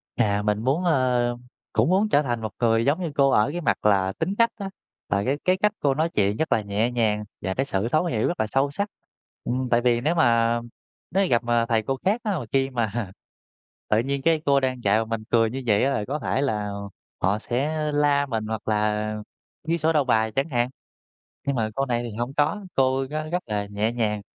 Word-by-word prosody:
À, 100 -1 +1
mình 105 +1 0
muốn, 140 +8 +1
ờ, 125 -7 +2 0.4
cũng 115 +7 +3
muốn 195 +4 +3
trở 145 - +4
thành 120 -5 -2
một 110 -1 -4
người 115 -1 +2
giống 150 +6 +1
như 170 -4 -2
cô 140 -1 +4
ở 120 -1 +3
cái 175 +3 -4
mặt 125 - 0
là 95 -2 +3
tính 185 +5 -1
cách 230 0 +5
á, 200 -3 -5 0.4
là 100 0 +1
cái 135 +3 +1
cái 185 +1 +3
cách 210 +2 +2
cô 140 -2 +2
nói 160 +4 0
chuyện 105 -7 +1
rất 160 - -1
là 110 - +3
nhẹ 105 +4 -1
nhàng 110 -3 +1 0.2
và 95 +1 -2
cái 135 +7 -1
sự 100 -4 -1
thấu 155 +6 +2
hiểu 115 -11 0
rất 175 - -3
là 110 - +1
sâu 135 +5 +1
sắc. 200 +8 -2 0.5
Ừm, 125 0 -2
tại 120 0 +3
vì 120 -1 +2
nếu 155 +5 +1
mà 115 -5 +3 0.5
nếu 195 +3 +3
mà 190 - +1
gặp 120 0 +2
mà 120 -1 +2
thầy 115 -2 +1
cô 135 +4 -2
khác 210 +5 +2
á, 205 -6 -1
mà 125 - -6
khi 135 0 +2
mà 115 -5 -2 0.8
tự 110 - +4
nhiên 135 +3 -1
cái 160 +1 +2
cô 140 -1 +4
đang 130 -2 -2
dạy 105 +2 +3
mà 115 - -1
mình 115 -1 -4
cười 115 -1 +4
như 130 +3 -5
vậy 105 -2 +3
á 135 - +2
là 105 - -1
có 145 +6 -3
thể 135 0 -1
là 105 -7 -1 0.5
họ 100 +4 +2
sẽ 130 +7 -1 0.2
la 145 -1 +2
mình, 110 -5 -3
hoặc 110 -1 -5
là 105 0 0 0.5
ghi 165 +1 +1
sổ 160 0 +1
đầu 150 -2 +3
bài 110 -4 +2
chẳng 135 +4 0
hạn. 120 -2 +1 0.8
Nhưng 140 - +1
mà 110 -3 0
cô 135 - 0
này 120 -2 -1
thì 115 -3 -6
hông 120 +3 -3
có, 160 +8 +1
cô 135 0 +2
rất 155 +1 -4
rất 180 +1 -1
là 105 -2 -2
nhẹ 105 +2 -1
nhàng, 110 -3 -1
125 Hz, 240 wpm, -24 LUFS, 110-145 Hz, 0.8 s, cách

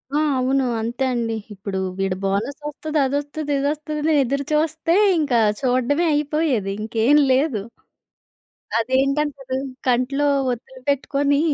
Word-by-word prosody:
ఆ! - - +3 0.2
అవును. 265 +1 +1 0.2
అంతే 240 +4 -2
అండి. 230 -2 -1 0.2
ఇప్పుడు 195 -1 -4 0.2
వీడు 195 -1 0
బోనస్ 210 +9 -1
వస్తది 305 +1 -3
అదొస్తది 290 +2 -3
ఇది 275 - -1
వస్తది 305 0 -4
అని 320 0 +2
ఎదురు 280 +2 -2
చూస్తే 320 +2 +1 0.2
ఇంకా 260 -6 +2 0.2
చూడడమే 255 +6 +1
అయిపోయేది! 290 -9 0
ఇంకేం 225 +6 +3
లేదు. 260 -5 +2 1.2
అదేంటంటారు? 270 +1 0 0.3
కంట్లో 255 +4 +1 0.3
ఒత్తులు 255 +2 -8
పెట్టుకొని 280 +1 +1
275 Hz, 120 wpm, -22 LUFS, 240-295 Hz, 1.2 s, ఆ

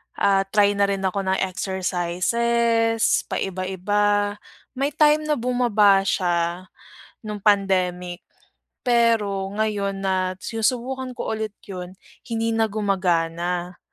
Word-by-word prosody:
ah, 195 -1 +3 0.2
try 205 -1 +5
na 200 0 +2
rin 195 -1 -2
ako 190 +1 0
ng 190 -1 0
exercises, 215 +6 0
paiba-iba. 205 +2 0 0.3
May 275 +2 -2
time 305 0 +4
na 300 - +2
bumaba 235 -6 +3
siya 175 -1 0 0.6
nung 210 -1 -5
pandemic, 185 -3 +1 0.6
pero 230 -5 +2
ngayon 200 -2 -1
na 185 -1 0
sinusubukan 250 +3 -2
ko - - -4
ulit 220 -1 -3
’yon, 185 -2 -8 0.3
hindi 230 0 -1
na 225 0 +2
gumagana. 180 -4 -1
200 Hz, 110 wpm, -23 LUFS, 185-225 Hz, 0.6 s, try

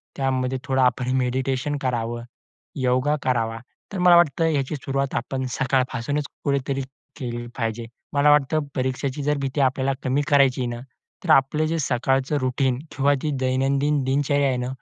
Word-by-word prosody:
त्यामध्ये 130 -1 0
थोडं 130 0 +1
आपण 125 0 +2
मेडिटेशन 130 +3 -1
करावं, 120 -2 -2 0.5
योगा 130 +2 +1
करावा. 115 -3 0 0.3
तर - - -3
मला 180 -1 +7
वाटतं, 170 -1 +4
याची 145 -1 0
सुरुवात 135 -1 -2
आपण 130 +2 -2
सकाळपासूनच 130 +1 0 0.2
कुठेतरी 140 -1 0 0.4
केली 120 -3 -4
पाहिजे. 115 -1 -2 0.3
मला 145 +1 +4
वाटतं, 150 +1 +3 0.2
परीक्षेची 130 +1 -2
जर 150 0 +1
भीती 135 +1 -1
आपल्याला 135 +1 +1
कमी 130 +3 +1
करायची 135 -3 +4
आहे 125 - -1
ना, 120 - -7 0.4
तर - - -6
आपलं 135 +3 +4
जे 165 - -1
सकाळचं 135 +2 0
रूटीन 130 0 0 0.2
किंवा 140 +1 +3
ती 150 - -1
दैनंदिन 135 +2 +1
दिनचर्या 140 +1 +1
आहे 130 - 0
ना, 125 0 -2
135 Hz, 155 wpm, -23 LUFS, 130-145 Hz, 0.5 s, मला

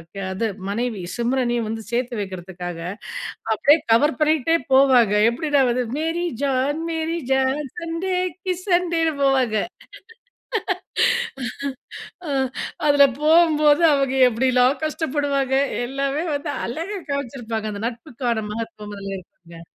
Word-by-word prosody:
க - - -8 0.2
அது 225 +4 -1 0.2
மனைவி 225 -1 -2
சிம்ரனையும் 240 -1 0
வந்து 225 +1 -4
சேர்த்து 240 -1 -1
வைக்கிறதுக்காக, 180 -2 -6 0.7
அப்டியே 285 +8 +5
கவர் 290 +7 +4
பண்ணிக்ட்டே 310 +1 +3 0.2
போவாங்க, 255 -6 +5 0.2
எப்டின்னா 285 +3 +1
வந்து 250 +1 +1
Mary 325 +3 -1 0.2
John, 275 +3 0
Mary 325 +1 -2
John, 265 +2 +2 0.2
Sun 330 -1 -4
டே 375 -1 0 0.3
கி 365 -1 0
சன்டேன்னு 345 -4 +2
போவாங்க. 260 -5 +2 2.7
அ - - -4 0.6
அதில 285 -1 +7 0.2
போகும்போது, 310 -1 +5
அவங்க 275 -2 +1
எப்டிலாம் 250 +3 +2
கஷ்டப்படுவாங்க 285 -3 0 0.3
எல்லாமே 275 +3 -1
வந்து 290 +1 -3
அழகா 335 +11 -4
காமிச்சிருப்பாங்க. 235 -5 -3
அந்த 200 - -6
நட்புக்கான 235 -2 -3
மகத்துவம் 215 -2 -6
அதுல 195 0 -5
இருக்குங்க. 170 -2 -14
265 Hz, 110 wpm, -22 LUFS, 230-305 Hz, 2.7 s, அதில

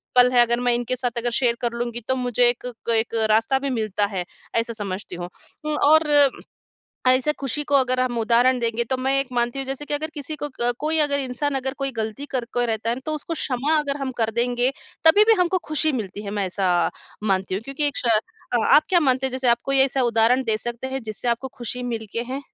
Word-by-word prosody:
पल 250 0 +7
है, 245 -1 +5
अगर 240 0 +2
मैं 245 0 +2
इनके 240 +1 -2
साथ 245 -2 -3
अगर 240 +1 -1
शेयर 235 -1 +2
कर 240 - 0
लूँगी 235 0 -3
तो 260 - +1
मुझे 245 -1 +2
एक 245 +1 -4 0.2
क - - +2
एक 225 +1 0 0.2
रास्ता 225 +5 +3
भी 275 +1 -3
मिलता 215 -5 0
है, 195 -3 -3 0.3
ऐसा 230 0 0
समझती 200 -4 -5
हूँ। 175 0 -6 0.4
उम, 305 0 0
और 315 +2 +5 1.1
ऐसे 255 +3 +3
खुशी 280 +2 -1
को 285 - -1
अगर 255 -2 +3
हम 250 -2 0
उदाहरण 240 +3 +3
देंगे 235 0 -1
तो 260 - +2
मैं 265 +1 0
एक 275 - -4
मानती 240 +1 0
हूँ 270 - -3
जैसे 270 +2 -4
कि - - -2
अगर 310 +2 -2
किसी 300 +1 -5
को 295 - 0
क 240 +1 +2
कोई 310 +2 0
अगर 290 -1 +2
इंसान 275 +2 -2
अगर 265 0 -2
कोई 275 -1 -1
गलती 220 +6 -3
करके 245 -1 -1
रहता 225 -1 -2
है - - +1
ना, - - -7
तो 310 - -1
उसको 305 +2 -4
क्षमा 285 +1 0
अगर 285 -2 -1
हम 270 -1 -2
कर 225 -1 +1
देंगे, 245 +1 +1 0.3
तभी 405 +7 +7
भी 450 - +5
हमको 360 +1 +2
खुशी 310 0 +1
मिलती 205 0 -7
है, 200 - -4
मैं 200 -1 -1
ऐसा 180 -2 +1 0.3
मानती 190 -2 0
हूँ 200 - -3
क्योंकि 275 +3 -1
एक 285 - -6
श - - -3 0.5
अ, - - +5
आप 300 - +6
क्या 350 -1 +4
मानते 265 -3 +2
हैं - - -3
जैसे 260 -1 0
आप 235 0 +4
कोई 275 0 +1
ऐसा 270 0 +3
उदाहरण 235 +2 +3
दे 220 -2 +1
सकते 240 +3 -5
हैं, 265 0 -4
जिससे 220 +2 -4
आपको 235 +3 -1
खुशी 245 +1 -4
मिल 230 -3 -4
के 230 - -1
हैं? 270 +2 -3
250 Hz, 240 wpm, -23 LUFS, 230-275 Hz, 1.1 s, पल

